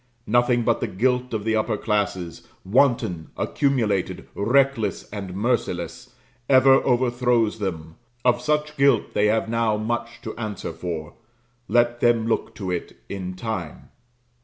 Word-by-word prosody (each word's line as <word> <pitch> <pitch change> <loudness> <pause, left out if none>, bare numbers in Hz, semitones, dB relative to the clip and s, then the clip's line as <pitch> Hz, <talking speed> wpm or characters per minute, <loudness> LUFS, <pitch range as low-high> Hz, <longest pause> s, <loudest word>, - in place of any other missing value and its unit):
Nothing 120 +1 +3
but 115 0 +2
the - - 0
guilt 125 +5 0
of 110 -3 -2
the 110 0 +1
upper 110 0 0
classes, 95 -6 -2 0.2
wanton, 105 - +2
accumulated, 115 -9 0
reckless, 130 +2 +1
and 100 -3 -6
merciless, 120 +4 -2 0.3
ever 135 0 +6
overthrows 120 -3 +1
them 80 -5 -5 0.3
Of 120 -1 +3
such 150 +1 -1
guilt 140 -5 +3
they 105 - +3
have 110 +1 +1
now 115 -2 +1
much 120 +2 -3
to 110 - -6
answer 110 -4 -5
for 80 -4 -5 0.5
let 120 +2 +2
them 120 -2 +3
look 115 - -1
to 95 -4 -4
it 90 - -4
in 95 -2 -5
time. 95 -5 -5
115 Hz, 135 wpm, -23 LUFS, 100-125 Hz, 0.5 s, ever